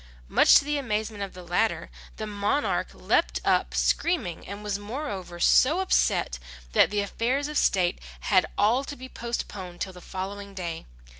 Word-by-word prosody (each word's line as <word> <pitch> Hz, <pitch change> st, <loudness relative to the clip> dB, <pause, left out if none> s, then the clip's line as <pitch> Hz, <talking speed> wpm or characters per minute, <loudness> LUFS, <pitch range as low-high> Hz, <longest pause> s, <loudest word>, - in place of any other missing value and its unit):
Much -, -, +6 dB
to 280 Hz, -, +6 dB
the 295 Hz, 0 st, 0 dB
amazement 215 Hz, -4 st, -2 dB
of 195 Hz, -2 st, -5 dB
the 180 Hz, -, -9 dB
latter, 180 Hz, +6 st, 0 dB, 0.3 s
the 215 Hz, -, -4 dB
monarch 210 Hz, +7 st, 0 dB
leapt -, -, +1 dB
up -, -, +2 dB
screaming, 320 Hz, -, 0 dB
and 200 Hz, +1 st, -7 dB
was 205 Hz, -1 st, -2 dB
moreover 205 Hz, -, -5 dB
so 290 Hz, -, +5 dB
upset, 360 Hz, -, +1 dB, 0.3 s
that -, -, +5 dB
the 205 Hz, 0 st, 0 dB
affairs 250 Hz, +8 st, -1 dB
of 300 Hz, -, -6 dB
state 180 Hz, -9 st, +2 dB, 0.2 s
had 185 Hz, -3 st, +3 dB
all 235 Hz, +6 st, +3 dB
to 285 Hz, -, -7 dB
be 260 Hz, -1 st, -9 dB
postponed 200 Hz, -8 st, -5 dB
till 190 Hz, -, -3 dB
the 180 Hz, -, -12 dB
following 200 Hz, +2 st, -6 dB
day. 170 Hz, -3 st, -5 dB
205 Hz, 165 wpm, -26 LUFS, 185-255 Hz, 0.3 s, Much